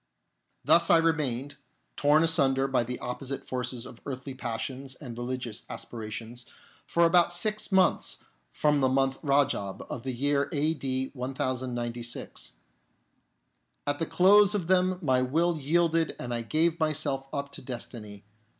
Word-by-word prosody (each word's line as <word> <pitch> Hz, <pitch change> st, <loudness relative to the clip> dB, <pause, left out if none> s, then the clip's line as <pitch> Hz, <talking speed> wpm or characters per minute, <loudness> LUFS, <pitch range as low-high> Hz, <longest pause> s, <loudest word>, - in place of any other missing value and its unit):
Thus 170 Hz, 0 st, +5 dB
I 170 Hz, -, +7 dB
remained, 145 Hz, -5 st, 0 dB, 0.4 s
torn 150 Hz, +2 st, +4 dB
asunder 135 Hz, -5 st, +3 dB
by 130 Hz, -3 st, +1 dB
the 125 Hz, +2 st, -5 dB
opposite 135 Hz, +2 st, -5 dB
forces 125 Hz, -1 st, -3 dB
of 120 Hz, -, -12 dB
earthly 135 Hz, 0 st, -6 dB
passions 130 Hz, +2 st, -5 dB
and 125 Hz, -5 st, -9 dB
religious 120 Hz, -2 st, -4 dB
aspirations, 115 Hz, +2 st, -7 dB, 0.4 s
for 170 Hz, 0 st, +3 dB
about 175 Hz, 0 st, +4 dB
six 210 Hz, +5 st, 0 dB
months 190 Hz, -2 st, +2 dB, 0.3 s
from 150 Hz, -, +2 dB
the 130 Hz, -, +3 dB
month 135 Hz, 0 st, +1 dB
Rajab 140 Hz, -9 st, 0 dB
of 120 Hz, -, -4 dB
the 130 Hz, -, -3 dB
year 140 Hz, +3 st, 0 dB
a.d. 140 Hz, -3 st, -1 dB
1096. 125 Hz, -2 st, -3 dB, 1.3 s
At 145 Hz, 0 st, 0 dB
the 165 Hz, -, -1 dB
close 205 Hz, +2 st, +5 dB
of 190 Hz, -5 st, -1 dB
them 185 Hz, +1 st, +2 dB
my 130 Hz, -3 st, +3 dB
will 160 Hz, +6 st, +1 dB
yielded 165 Hz, +2 st, +1 dB
and 120 Hz, -1 st, -4 dB
I 120 Hz, -, -1 dB
gave 160 Hz, +8 st, +1 dB
myself 155 Hz, -3 st, 0 dB
up 140 Hz, 0 st, -4 dB
to -, -, -8 dB
destiny. 115 Hz, -5 st, -7 dB
135 Hz, 140 wpm, -28 LUFS, 125-160 Hz, 1.3 s, I